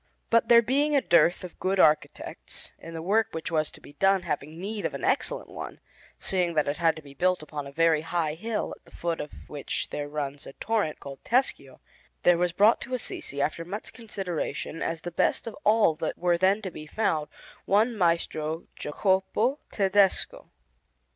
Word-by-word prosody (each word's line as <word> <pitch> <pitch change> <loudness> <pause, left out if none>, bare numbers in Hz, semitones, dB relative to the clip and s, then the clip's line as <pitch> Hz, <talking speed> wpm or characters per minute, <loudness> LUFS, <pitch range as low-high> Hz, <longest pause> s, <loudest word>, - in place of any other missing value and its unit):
But 230 0 +4
there 235 0 +8
being 285 +5 +2
a 280 - +5
dearth 175 -2 +4
of 180 - -9
good 190 +1 0
architects, 155 -2 +1
and 165 0 -9
the 160 - -5
work 215 +4 +3
which 160 +1 -4
was 155 -2 +1
to - - -15
be - - -14
done 195 +4 +3
having 150 +3 -4
need 205 +3 -4
of - - -2
an - - -6
excellent - - 0
one, - - -7 0.4
seeing 180 -3 -1
that 150 - +2
it 145 - -1
had 165 -2 +3
to 155 - -10
be 140 -1 -13
built 180 +3 +1
upon 150 -2 -6
a - - -9
very 160 +1 +3
high 165 -1 -1
hill 215 +7 -3
at - - -27
the - - -16
foot 170 -1 -1
of 150 - -10
which 145 -2 -3
there 145 0 -4
runs 145 -1 -4
a - - -9
torrent 210 -6 -1
called 140 -1 -9
Tescio, 255 +3 0 0.4
there 175 -1 +5
was 180 0 +2
brought 205 +6 +4
to 255 +1 -3
Assisi, 140 - -3
after 160 +3 -2
much 195 +6 -6
consideration, 185 - -4
as 165 0 -2
the 175 - -5
best - - +1
of 230 - -6
all 215 - +5
that 155 - -3
were 175 0 +2
then 190 +5 +2
to 190 - -4
be 155 -1 -9
found, 155 -5 0 0.4
one 220 +4 +3
Maestro 165 -3 0
Jacopo 190 - +1
Tedesco. 195 -1 +2
175 Hz, 195 wpm, -27 LUFS, 155-210 Hz, 0.4 s, there